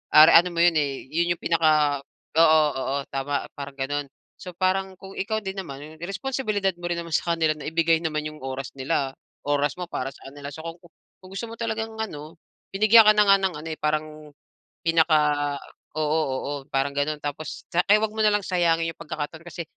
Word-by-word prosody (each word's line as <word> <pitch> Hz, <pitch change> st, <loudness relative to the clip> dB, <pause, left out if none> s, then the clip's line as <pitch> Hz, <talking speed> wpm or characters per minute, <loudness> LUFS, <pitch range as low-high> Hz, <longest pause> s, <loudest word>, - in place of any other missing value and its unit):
are 155 Hz, +1 st, +10 dB
ano 175 Hz, +2 st, +7 dB
mo 170 Hz, -, +3 dB
yun, 175 Hz, -1 st, +5 dB
eh, 140 Hz, -2 st, -2 dB
'yun 170 Hz, +2 st, +1 dB
'yung -, -, -29 dB
pinaka, 155 Hz, -4 st, +3 dB, 0.4 s
oo, 160 Hz, -1 st, +7 dB, 0.2 s
oo, 135 Hz, +1 st, -2 dB, 0.2 s
tama, 140 Hz, +1 st, -2 dB, 0.2 s
parang 140 Hz, 0 st, -7 dB
gano'n. 140 Hz, +1 st, -2 dB, 0.3 s
So 180 Hz, -, -9 dB
parang 190 Hz, +2 st, 0 dB
kung 195 Hz, 0 st, -11 dB
ikaw 220 Hz, +2 st, -1 dB
din 195 Hz, -2 st, -6 dB
naman 150 Hz, -4 st, -8 dB
responsibilidad 205 Hz, -1 st, -1 dB
mo 175 Hz, 0 st, -5 dB
rin 170 Hz, -, -1 dB
naman 170 Hz, -2 st, -3 dB
sa 170 Hz, -, 0 dB
kanila 160 Hz, -2 st, +1 dB
na 150 Hz, -, -10 dB
ibigay 165 Hz, 0 st, +3 dB
naman 155 Hz, -2 st, -1 dB
'yung 155 Hz, 0 st, -10 dB
oras 135 Hz, 0 st, -5 dB
nila, 135 Hz, -1 st, 0 dB, 0.4 s
oras 145 Hz, 0 st, +1 dB
mo 180 Hz, -, -4 dB
para 135 Hz, +1 st, -3 dB
sa -, -, -13 dB
ano 140 Hz, -, -17 dB
nila. 140 Hz, 0 st, -7 dB
So -, -, -10 dB
kung 165 Hz, 0 st, -6 dB, 0.5 s
kung 185 Hz, -, -12 dB
gusto 235 Hz, -, -4 dB
mo 230 Hz, -, -7 dB
talagang 225 Hz, -1 st, -3 dB
ano, 155 Hz, -6 st, -6 dB, 0.4 s
binigyan 215 Hz, +3 st, +7 dB
ka 215 Hz, -, +10 dB
na 210 Hz, -, +6 dB
nga 195 Hz, -, +8 dB
ng 190 Hz, -4 st, -1 dB
ano, 160 Hz, -, -8 dB
eh, 155 Hz, -, -6 dB
parang, 150 Hz, 0 st, 0 dB, 0.8 s
pinaka, 150 Hz, -3 st, +2 dB, 0.4 s
oo, 155 Hz, +1 st, +1 dB
oo, 130 Hz, +2 st, -3 dB, 0.2 s
parang 135 Hz, 0 st, +1 dB
gano'n, 145 Hz, +1 st, -1 dB
tapos, 145 Hz, +1 st, -5 dB
kaya 195 Hz, +5 st, +4 dB
'wag 220 Hz, -1 st, 0 dB
mo -, -, -5 dB
nalang 210 Hz, -1 st, +4 dB
sayangin 165 Hz, -3 st, +1 dB
'yung -, -, -66 dB
pagkakataon, 160 Hz, 0 st, -6 dB
kasi 170 Hz, 0 st, -6 dB
165 Hz, 200 wpm, -25 LUFS, 145-185 Hz, 0.8 s, are